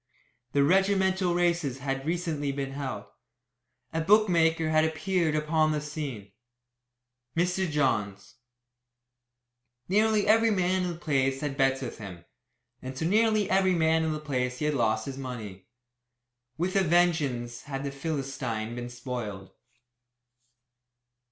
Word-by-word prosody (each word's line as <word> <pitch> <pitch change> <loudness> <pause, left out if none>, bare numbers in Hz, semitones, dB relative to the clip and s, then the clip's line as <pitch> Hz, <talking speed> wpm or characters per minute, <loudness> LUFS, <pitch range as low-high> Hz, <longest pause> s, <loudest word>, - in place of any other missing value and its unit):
The 140 - +4
regimental 190 +1 +2
races 170 -6 +1
had 135 +1 -3
recently 160 -4 -1
been 135 0 -4
held; 135 -7 -5 0.9
a 160 - 0
bookmaker 165 -4 +3
had 155 0 +4
appeared 160 0 0
upon 155 +1 +2
the 150 - 0
scene 145 -9 -6 1.1
Mr. 180 +1 +1
Johns. 105 -9 -1 1.5
Nearly 215 +2 +3
every 225 +1 +5
man 185 -2 +1
in 175 - -2
the - - -10
place 135 -4 0
had 145 -1 -1
had 135 - -10
bets 135 0 +2
with 120 - -6
him, 90 -5 -9 0.6
and 130 0 -7
to 160 - -3
nearly 215 +2 +3
every 190 -1 +3
man 160 -1 +2
in 160 - 0
the 155 - -3
place 125 -4 -2
he 150 - -2
had 150 - +1
lost 110 -4 +1
his 135 -1 -6
money. 110 -8 -7 0.9
With 180 +3 -1
a 195 - +5
vengeance 155 -9 +1
had 135 -2 -4
the 140 - -3
Philistine 135 -6 -3
been 120 0 -5
spoiled. 120 -6 -6
150 Hz, 135 wpm, -28 LUFS, 130-175 Hz, 1.5 s, every